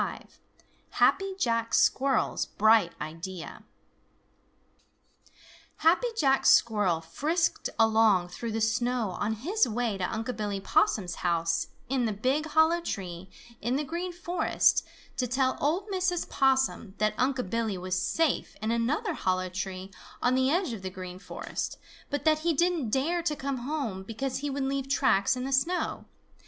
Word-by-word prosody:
XXV - - -4 0.7
HAPPY 390 0 +2
JACK 230 -7 0
SQUIRREL'S 270 0 +2
BRIGHT 215 -5 +4
IDEA 165 +3 -7 2.1
Happy 340 +10 +3
Jack 270 -7 +3
Squirrel 210 -10 +4
frisked 310 - -1
along 220 -5 +4
through 230 +6 -5
the 225 +1 -2
snow 235 -1 0
on 205 +4 -2
his 290 - +1
way 225 -3 -2
to 180 - -1
Unc' 225 +3 -3
Billy 205 -2 -3
Possum's 190 -1 +1
house 170 -1 0 0.2
in 255 -2 0
the 220 - 0
big 265 +9 0
hollow 320 +2 +3
tree 185 - -5 0.3
in 240 +4 0
the 295 - 0
Green 345 +5 -4
Forest 350 +1 +1 0.3
to 255 -2 0
tell 260 +1 +1
old 340 +8 0
Mrs. 370 -2 0
Possum 265 -6 +1
that 215 0 +1
Unc' 255 -6 0
Billy 225 -4 -1
was 185 0 -2
safe 325 +7 0
in 220 +2 -1
another 235 +6 0
hollow 185 0 -1
tree 190 +1 -5 0.3
on 245 - +2
the 260 +1 +2
edge 340 -4 0
of 215 - -6
the 190 - -4
Green 185 -1 -8
Forest, 195 - -5 0.3
but 285 0 -3
that 310 -1 +4
he 330 0 0
didn't 340 -6 +1
dare 310 +9 0
to 305 -3 -1
come 275 -1 -3
home 245 -7 -3
because 230 +7 -4
he 290 +1 -3
would 275 0 -2
leave 270 0 -2
tracks 260 -6 +3
in 250 - -4
the 270 - -2
snow. 335 +7 0
245 Hz, 155 wpm, -28 LUFS, 200-290 Hz, 2.1 s, BRIGHT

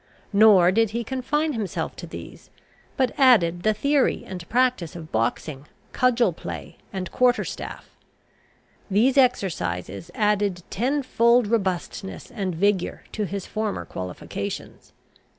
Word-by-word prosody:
Nor 200 -4 +7
did 225 +2 +3
he 235 - -1
confine 290 +6 -1
himself 215 -6 -3
to - - -7
these, - - -10 0.5
but 260 -2 +1
added 180 -11 +5
the 215 - +3
theory 280 +3 +1
and 180 -2 -8
practice 245 -10 +1
of 160 -2 -9
boxing, 130 +5 -2 0.2
cudgel 250 -2 +2
play, - - -8
and 190 -3 -5
quarter 250 -1 +3
staff. - - -7 1.0
These 225 +7 +3
exercises 165 - 0
added 205 -4 +1
ten 270 +7 0
fold 235 -1 +4
robustness 195 -1 -2
and 195 -7 -3
vigour 195 +1 0
to 215 - -2
his 195 0 -5
former 215 -2 -3
qualifications. 90 -1 -6
210 Hz, 125 wpm, -24 LUFS, 180-250 Hz, 1.0 s, Nor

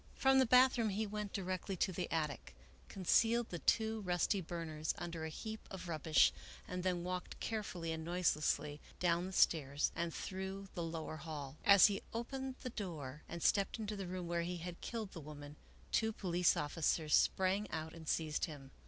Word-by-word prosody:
From 265 0 +5
the 260 - +4
bathroom 250 -2 +5
he 210 +2 -1
went 210 -1 -4
directly 185 0 -3
to 190 - +1
the 180 0 -3
attic, 150 - -2 0.3
concealed 225 +5 +3
the 175 - -4
two 220 +2 +2
rusty 185 +1 +1
burners 160 -2 -3
under 170 -2 -4
a - - -3
heap 220 +7 -7
of 185 -2 -7
rubbish, 160 -1 +4 0.3
and 180 0 -3
then 180 -1 0
walked 180 0 -4
carefully 185 -7 -3
and 160 0 -3
noiselessly 155 -3 0 0.2
down 175 0 +2
the - - -6
stairs 145 -5 +3
and 170 0 -1
through 190 +2 -5
the 175 - -3
lower 165 -1 -4
hall. 150 -2 -6
As 200 -2 +9
he 200 -2 +2
opened 265 +3 -3
the 255 - -4
door 150 - -5
and 170 0 -5
stepped 200 +2 +3
into 215 -1 -3
the 195 -2 -5
room 180 0 -4
where 170 0 0
he 175 +1 -3
had 175 0 -7
killed 220 -4 -4
the 165 - -8
woman, 145 0 -9 0.4
two 220 -1 +2
police 180 -4 +2
officers 155 +1 0
sprang 190 +2 +3
out 160 0 -4
and 160 -2 -11
seized 155 -1 0
him. 140 -4 -10
175 Hz, 180 wpm, -37 LUFS, 160-200 Hz, 0.4 s, As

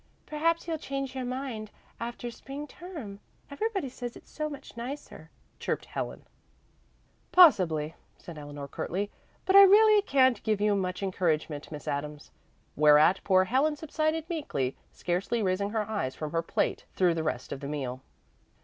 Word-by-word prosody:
"Perhaps 330 +3 0
you'll 325 -2 -2
change 275 -2 -4
your 260 -1 -3
mind 250 -4 -4 0.3
after 240 +1 -5
spring 275 +5 -8
term. 295 - -9 0.3
Everybody 390 0 -2
says 245 -1 -7
it's - - -18
so 305 0 -3
much 285 -2 -10
nicer," 250 +5 -7 0.3
chirped - - -2
Helen. - - -5 1.1
"Possibly," 170 - +6 0.2
said 170 - -10
Eleanor 145 -1 -7
curtly, 195 +8 -3 0.3
"but 380 - +3
I 395 - +12
really 420 +2 +7
can't 260 - +3
give 215 -2 0
you 210 0 +3
much 185 -1 -2
encouragement, 160 -6 -1
Miss 150 -2 -8
Adams." 145 +1 -4 0.4
Whereat 150 +5 +6
poor 185 -1 +4
Helen 270 +9 +2
subsided 310 +1 -1
meekly, 140 - -2 0.2
scarcely 190 +6 -1
raising 195 +1 0
her 215 -1 -1
eyes 205 -12 -2
from 155 -1 -5
her 165 - +1
plate 165 - -1
through 180 -2 +3
the 165 - -2
rest 130 -6 -3
of 135 - -4
the 140 - -6
meal. 135 -3 -4
215 Hz, 155 wpm, -29 LUFS, -, 1.1 s, I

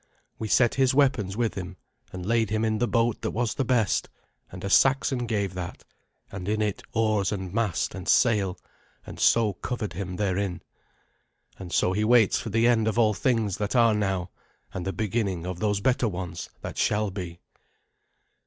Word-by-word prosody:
We 110 - -3
set 120 +2 +3
his 130 -1 +2
weapons 130 -9 +2
with 115 -2 0
him, 90 -2 -7 0.3
and 90 -1 -7
laid 115 0 +1
him 110 +1 0
in 110 -1 0
the 120 - +1
boat 115 -2 +1
that - - -1
was 115 0 -1
the 135 - -1
best 120 -6 +1 0.4
and - - -9
a - - -2
Saxon 130 +2 +3
gave 100 -4 -1
that 90 -1 -6 0.5
and 95 0 -5
in 110 0 0
it 105 -2 -1
oars 110 -4 +1
and 95 -3 -4
mast 110 -4 0
and 95 -2 -8
sail, 105 -7 +3 0.5
and - - -10
so 110 -3 +4
covered 105 0 -4
him 90 +1 -5
therein. 95 -2 -2 1.0
And 90 -3 -8
so 90 - +2
he 105 +3 0
waits 115 -2 +4
for - - -5
the 115 +2 +2
end 115 -2 +3
of 110 - 0
all 110 -2 +4
things 110 -3 0
that 105 +3 -2
are 115 -2 +5
now, 95 -4 -1 0.4
and 90 0 -4
the - - 0
beginning 100 -4 -2
of 90 -1 -5
those 105 -1 0
better 125 +1 +2
ones 90 -4 -5
that - - -6
shall 105 -1 +1
be. 90 -3 -7
105 Hz, 185 wpm, -26 LUFS, 95-115 Hz, 1.0 s, are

